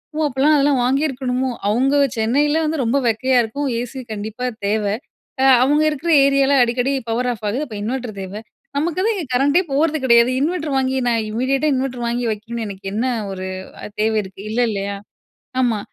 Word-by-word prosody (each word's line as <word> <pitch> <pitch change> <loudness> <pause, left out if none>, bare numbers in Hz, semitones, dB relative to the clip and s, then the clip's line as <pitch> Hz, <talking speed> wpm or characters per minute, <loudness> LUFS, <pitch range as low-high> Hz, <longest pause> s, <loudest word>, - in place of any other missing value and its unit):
"ஓ! - - -4
அப்போலாம் 280 +3 +2
அதெல்லாம் 280 -2 +3
வாங்கியிருக்கணுமோ?" 260 -1 0 0.2
அவங்க 260 +6 +2 0.2
சென்னையில 290 +8 +2
வந்து 305 -2 -1
ரொம்ப 240 +4 +1
வெக்கையா 250 +3 +2
இருக்கும், 280 +6 -3
ஏசி 260 +2 -6
கண்டிப்பா 220 +4 -5 0.2
தேவ. 215 +1 +1 0.6
அ - - +3 0.2
அவங்க 295 +3 +3
இருக்கிற 310 +3 -2
ஏரியால 275 0 +3
அடிக்கடி 245 +3 0 0.2
பவர் 245 +2 0
ஆஃப் 220 -2 -9
ஆகுது, 245 +7 -2
அப்ப 220 - -8
இன்வெர்டர் 235 0 -4
தேவ. 190 0 -7 0.4
நமக்கு 320 +4 -1
தான் 455 - +2
இங்க 360 -5 -4
கரண்டே 285 +7 +3
போறது 310 +2 +2
கெடையாது. 235 0 +5
இன்வெட்டர் 310 0 -1
வாங்கி 265 0 0
நான் 230 -1 +1
இமீடியட்டா 265 +6 0
இன்வெட்டர் 255 -2 -2
வாங்கி 240 +1 -1
வைக்கணும்னு 225 +2 -5
எனக்கு 195 -1 -9
என்ன 220 +3 -1 0.3
ஒரு 185 0 -5 0.4
அ - - -5 0.2
தேவை 220 0 +1
இருக்கு? 190 0 -11
இல்ல 230 +3 0
இல்லையா? 200 -1 -3 0.7
ஆமா. 240 -4 +2
255 Hz, 175 wpm, -20 LUFS, 225-280 Hz, 0.7 s, கெடையாது